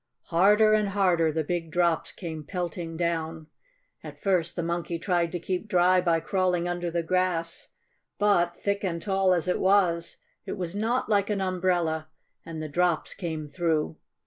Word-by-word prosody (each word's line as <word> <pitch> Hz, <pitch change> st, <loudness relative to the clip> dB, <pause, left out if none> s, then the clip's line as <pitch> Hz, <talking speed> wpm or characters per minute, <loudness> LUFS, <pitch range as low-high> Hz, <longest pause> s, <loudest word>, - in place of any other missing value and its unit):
Harder 210 Hz, +5 st, +5 dB
and 210 Hz, -2 st, +2 dB
harder 180 Hz, -5 st, +2 dB
the 160 Hz, +1 st, -1 dB
big 165 Hz, +1 st, -3 dB
drops 170 Hz, 0 st, +1 dB
came 160 Hz, -4 st, -7 dB
pelting 170 Hz, -1 st, -4 dB
down. 165 Hz, -2 st, -2 dB, 0.6 s
At -, -, -10 dB
first 175 Hz, -4 st, +1 dB
the 175 Hz, -, -2 dB
Monkey 170 Hz, 0 st, -2 dB
tried 170 Hz, -1 st, 0 dB
to 175 Hz, -, -3 dB
keep 185 Hz, +4 st, -3 dB
dry 180 Hz, -2 st, +4 dB
by 170 Hz, -2 st, +2 dB
crawling 180 Hz, -2 st, 0 dB
under 175 Hz, 0 st, -2 dB
the 170 Hz, 0 st, -1 dB
grass. 170 Hz, -1 st, -1 dB, 0.5 s
But, 175 Hz, -4 st, +2 dB
thick 200 Hz, 0 st, -1 dB
and 170 Hz, -3 st, -1 dB
tall 190 Hz, +1 st, +1 dB
as 180 Hz, -1 st, +1 dB
it 180 Hz, -, +1 dB
was, 180 Hz, -4 st, +2 dB, 0.3 s
it -, -, -5 dB
was 180 Hz, 0 st, -4 dB
not 230 Hz, +5 st, 0 dB
like 205 Hz, -2 st, +2 dB
an 205 Hz, -1 st, 0 dB
umbrella, 175 Hz, -4 st, 0 dB, 0.4 s
and 160 Hz, -1 st, -6 dB
the -, -, -4 dB
drops 175 Hz, +2 st, 0 dB
came 160 Hz, -4 st, -5 dB
through. 160 Hz, -1 st, -1 dB
175 Hz, 170 wpm, -27 LUFS, 165-185 Hz, 0.6 s, Harder